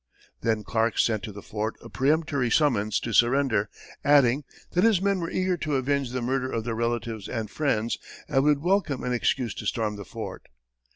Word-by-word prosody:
Then 110 -2 0
Clark 115 0 0
sent 110 -3 +2
to 110 - -6
the 100 0 -10
fort 110 +1 -3
a - - -11
peremptory 140 0 +1
summons 110 -7 +2
to 115 - -4
surrender, 120 -3 +3 0.3
adding, 140 -1 +4 0.3
that 180 - +2
"his 220 -5 +5
men 195 0 +1
were 165 -1 -3
eager 185 -1 0
to 150 -3 -2
avenge 135 0 0
the 125 0 -3
murder 130 +1 -1
of 115 - -2
their 115 0 -2
relatives 115 -2 -2
and 110 -3 -3
friends 120 -7 0 0.3
and 135 -2 +2
would 145 0 +3
welcome 180 -7 +1
an 125 - -1
excuse 120 -1 0
to - - -6
storm 110 -3 -1
the 100 - -7
fort." 105 -3 -7
125 Hz, 190 wpm, -26 LUFS, 110-145 Hz, 0.3 s, his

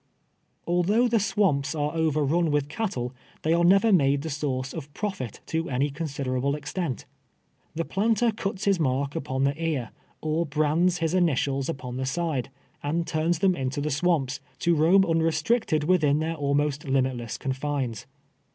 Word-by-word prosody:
Although 185 +8 +2
the 230 -1 +2
swamps 180 -9 +1
are 150 0 -1
overrun 160 +1 +1
with 145 -1 0
cattle, 150 - -3 0.3
they 160 - +2
are 170 +1 +3
never 195 +5 +5
made 140 -4 +3
the 160 - -4
source 135 -2 -2
of 145 -3 -7
profit, 190 - -4
to 165 +1 -2
any 140 +2 0
considera 140 -4 -3
ble 140 +2 +1
extent. 150 -1 -4 0.7
The 165 +1 -1
planter 225 +3 +2
cuts 195 -3 -4
his 195 -3 +3
mark 140 -1 0
upon 130 -1 -2
the 140 +1 +2
ear, 145 -8 -1 0.3
or 155 +2 -1
brands 155 +5 +2
his 165 -1 -1
initials 140 -6 +1
upon 130 -5 -5
the 130 0 -2
side, 155 -3 -1 0.3
and 165 +4 -1
turns 160 +2 0
them 185 +1 +3
into 130 0 -2
the 150 +1 -1
swamps, 145 -3 +1 0.2
to 170 - +3
roam 170 +5 +5
unrestricted 165 +2 +1
within 150 -4 +3
their 160 +2 -1
almost 145 -1 0
limitless 130 -4 -1
confines. 130 -5 -3
155 Hz, 160 wpm, -26 LUFS, 140-175 Hz, 0.7 s, never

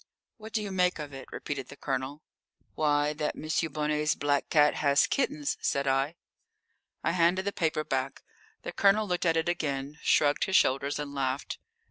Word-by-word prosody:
"What 220 -1 -10
do 215 -1 -1
you 200 - -5
make 180 -1 +2
of 150 -3 -7
it?" 135 - -9
repeated 135 -3 -5
the - - -11
Colonel. 135 +2 -4 0.5
"Why, 150 -1 +1
that 150 0 -2
M. 155 0 -1
Bonnet's 150 0 0
black 145 -1 0
cat 150 -1 +5
has 140 -1 +4
kittens," 150 - -1
said 140 0 0
I. 135 +4 +1 0.9
I - - +2
handed 180 +2 +2
the 200 - 0
paper 155 -2 0
back. 135 -1 -3 0.4
The - - -4
Colonel 205 +2 +3
looked 180 -1 0
at 165 0 +3
it 160 +1 0
again, 145 -4 -2
shrugged 145 -1 +3
his 190 -1 -1
shoulders, 140 +2 +3
and 145 -1 -5
laughed. 135 0 -2
150 Hz, 175 wpm, -29 LUFS, 140-170 Hz, 0.9 s, cat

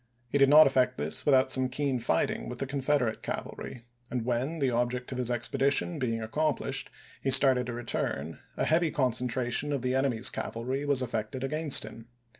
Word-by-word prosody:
He 140 - 0
did 140 0 +5
not 155 +2 +8
effect 130 -2 +1
this 75 - -1
without 130 -2 +4
some 130 -1 +1
keen 135 -1 -1
fighting - - -1
with - - -7
the - - -3
Confederate 135 -4 -1
cavalry, 120 - -6 0.3
and 125 -3 -3
when, 125 +6 -2
the 135 -4 0
object 120 +2 -2
of 130 - -4
his 125 -1 -1
expedition 140 +6 0
being 115 -3 -2
accom 150 +7 -1
plished, 135 0 -3 0.3
he 135 - -1
started 130 -2 +6
to 120 - -4
return, 80 - -3 0.2
a - - 0
heavy 165 +1 +2
concentra 125 -2 0
tion 145 +4 0
of 140 -3 -2
the 125 0 0
enemy's 130 -3 +2
cavalry 130 +5 -4
was 135 -3 +2
effected 120 +2 -4
against 150 +1 0
him. 115 +1 -11
130 Hz, 190 wpm, -28 LUFS, 120-140 Hz, 0.3 s, not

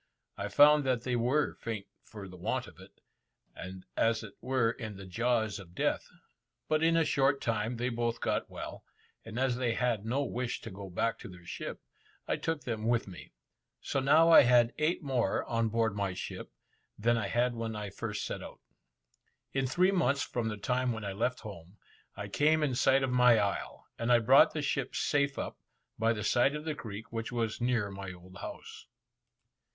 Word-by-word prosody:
I - - -3
found 150 0 +6
that 125 -3 0
they 125 -1 -1
were 125 +6 +1
faint 110 -3 -5 0.2
for 105 -3 -10
the 90 - -11
want 90 - -2
of - - -15
it, - - -16 0.5
and 95 0 -9
as 115 -1 +2
it 110 - -9
were 125 -2 +1
in 110 -4 -7
the 100 - -9
jaws 110 +1 0
of 90 -2 -13
death; - - 0 0.6
but 155 0 +1
in 165 +1 +4
a 165 - +3
short 135 0 +2
time 115 +1 -1
they 125 +2 -1
both 120 -1 -1
got - - -1
well, - - -7 0.4
and 110 +1 -8
as 130 -1 +1
they 120 -3 0
had 120 -5 0
no 130 +6 0
wish 125 -2 -3
to 115 - -8
go 95 0 -8
back 115 +6 -1
to - - -9
their 90 -1 -13
ship, - - -6 0.4
I - - 0
took 160 -2 -2
them 110 -2 -3
with 120 -2 +1
me. 90 -2 -11 0.5
So - - -2
now 155 +5 +5
I - - +10
had 120 -2 +4
eight 155 +3 +1
more 130 -4 0
on 115 -1 0
board 110 -1 +1
my 100 -3 -2
ship, - - -6 0.5
than 120 +3 +2
I 110 -4 -1
had 120 +4 +1
when 115 -1 -4
I 105 -2 -5
first 105 +1 -4
set - - -4
out. - - -10 0.9
In 135 -1 0
three 180 +8 +3
months 140 -7 +2
from 120 -2 -2
the 105 -2 -3
time 125 +4 0
when 110 -2 -6
I 100 - -2
left 125 +5 -1
home, 95 -2 -10 0.4
I 100 0 -5
came 155 +8 +2
in 140 -4 +1
sight 135 +2 +3
of 130 - 0
my 125 -2 +6
isle, 100 -2 -2
and 115 +1 0
I 120 - +7
brought 125 +4 +6
the 155 - -1
ship 140 -2 -2
safe 140 -1 +1
up, - - -5 0.4
by 115 0 +3
the 105 -2 -2
side 130 +4 +3
of 150 +1 -6
the 155 - -1
creek, 110 -6 -8
which 115 +1 -3
was 115 -2 -2
near 120 -5 +1
my 95 -1 -6
old 90 +1 -13
house. - - -9
115 Hz, 200 wpm, -31 LUFS, 105-130 Hz, 0.9 s, I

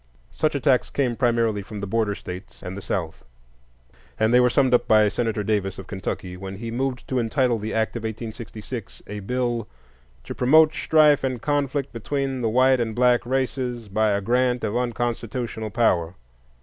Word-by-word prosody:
Such 155 -1 0
attacks 130 -2 +2
came 125 -4 0
primarily 115 -4 +1
from 105 +2 -8
the 100 - -3
Border 105 0 0
States 90 -1 -9
and 90 +1 -5
the 100 - -6
South; 85 -4 -4 1.0
and 110 +2 +3
they 125 - +7
were 125 0 +5
summed 130 0 +2
up 125 - +3
by 110 -1 +5
Senator 110 -1 -1
Davis, 100 -2 -1
of 95 - -8
Kentucky, 95 -2 -5
when 95 +1 -7
he 115 +3 -6
moved 130 +1 -2
to 130 - 0
entitle 120 0 +1
the 110 +2 -4
act 110 +1 0
of 120 - -3
1866 110 +1 -7
a 105 0 -6
bill 120 +1 -2 0.6
"to - - -6
promote 155 +5 +5
strife 150 -3 +4
and 130 -2 -1
conflict 140 0 -1
between 135 +2 -2
the 115 - +1
white 130 +3 +4
and 110 -2 -2
black 125 -1 +3
races… 125 -3 -2
by 110 +2 +2
a 100 0 +1
grant 125 +3 +1
of 105 - -1
unconstitutional 120 -2 -2
power." 95 -6 +1
115 Hz, 175 wpm, -24 LUFS, 105-125 Hz, 1.0 s, they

